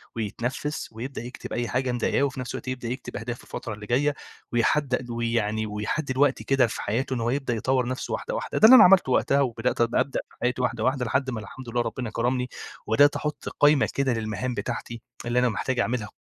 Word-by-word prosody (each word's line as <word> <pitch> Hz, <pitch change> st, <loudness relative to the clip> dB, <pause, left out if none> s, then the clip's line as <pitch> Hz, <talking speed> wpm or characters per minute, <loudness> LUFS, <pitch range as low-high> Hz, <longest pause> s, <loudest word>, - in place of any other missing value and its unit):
ويتنفِّس 120 Hz, +7 st, -3 dB
ويبدأ 120 Hz, +4 st, -6 dB
يكتِب 125 Hz, +2 st, -8 dB
أي 120 Hz, 0 st, -1 dB
حاجة 130 Hz, +1 st, 0 dB
مضايقاه 125 Hz, +3 st, +1 dB
وفي 135 Hz, -2 st, -1 dB
نفْس 125 Hz, -, -5 dB
الوقت -, -, -7 dB
يبدأ 130 Hz, -2 st, -4 dB
يكتب 125 Hz, +2 st, -5 dB
أهدافه 120 Hz, +3 st, -5 dB
الفترة 120 Hz, -3 st, -6 dB
اللي 105 Hz, 0 st, -9 dB
جاية 140 Hz, +6 st, +1 dB, 0.4 s
ويحدّ 125 Hz, +1 st, +1 dB
ويعني، 115 Hz, -2 st, -1 dB
ويحدّد 105 Hz, +8 st, -3 dB
الوقت 135 Hz, +1 st, +2 dB
كده 135 Hz, -3 st, +3 dB
في -, -, -5 dB
حياته 125 Hz, +5 st, -1 dB
إن 120 Hz, -, -2 dB
هو 115 Hz, -, 0 dB
يبدأ 135 Hz, -1 st, -1 dB
يطوّر 125 Hz, +2 st, 0 dB
نفْسه 130 Hz, 0 st, -3 dB
واحدة، -, -, -3 dB
واحدة، -, -, -3 dB
ده -, -, +7 dB
اللي 250 Hz, +4 st, +11 dB
أنا 255 Hz, -, +10 dB
عملته 180 Hz, -7 st, +6 dB
وقتها 140 Hz, +2 st, +3 dB
وبدأت 120 Hz, -2 st, 0 dB
أبدأ 120 Hz, +3 st, +1 dB
في -, -, -22 dB
حياتي 125 Hz, +1 st, 0 dB
واحدة، 125 Hz, -3 st, -1 dB
واحدة، 130 Hz, 0 st, +1 dB
لحد 130 Hz, +3 st, 0 dB
ما 120 Hz, -3 st, -3 dB
الحمد 120 Hz, +3 st, -9 dB
لله 120 Hz, +1 st, 0 dB
ربنا 120 Hz, +1 st, -3 dB
كرَمني 125 Hz, +3 st, -1 dB, 0.4 s
وبدأت 145 Hz, +7 st, +5 dB
أحُط 150 Hz, -1 st, -3 dB
قايمة 145 Hz, -1 st, +5 dB
كده 135 Hz, -2 st, +1 dB
للمهام 110 Hz, +2 st, -3 dB
بتاعتي 120 Hz, -1 st, -5 dB, 0.2 s
اللي 120 Hz, +1 st, +1 dB
أنا 125 Hz, 0 st, +3 dB
محتاج 125 Hz, +3 st, -2 dB
أعملها 120 Hz, -3 st, -1 dB
125 Hz, 205 wpm, -25 LUFS, 115-135 Hz, 0.4 s, اللي